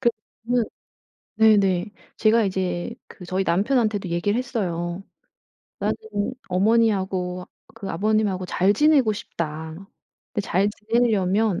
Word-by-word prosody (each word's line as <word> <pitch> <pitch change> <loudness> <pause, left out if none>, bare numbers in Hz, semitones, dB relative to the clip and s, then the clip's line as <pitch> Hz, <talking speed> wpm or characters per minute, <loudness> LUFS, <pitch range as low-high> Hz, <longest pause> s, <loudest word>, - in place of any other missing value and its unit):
그 240 -3 +4 0.4
저는 245 -1 +2 0.7
네네. 205 -3 +4 0.2
제가 225 +1 +4
이제 185 +1 -2
그 180 - -12
저희 190 +1 -1
남편한테도 205 +2 +1
얘기를 175 +6 0
했어요. 185 -8 -3 0.8
"나는 - - 0 0.5
어머니하고 190 -3 +1 0.3
그 215 -4 -7
아버님하고 205 0 0
잘 185 +2 +2
지내고 275 -3 +4
싶다." 160 -5 -5 0.6
근데 210 - -1
잘 195 -1 +2
지내려면 210 -3 +1
200 Hz, 255 characters per minute, -23 LUFS, 180-220 Hz, 0.8 s, 그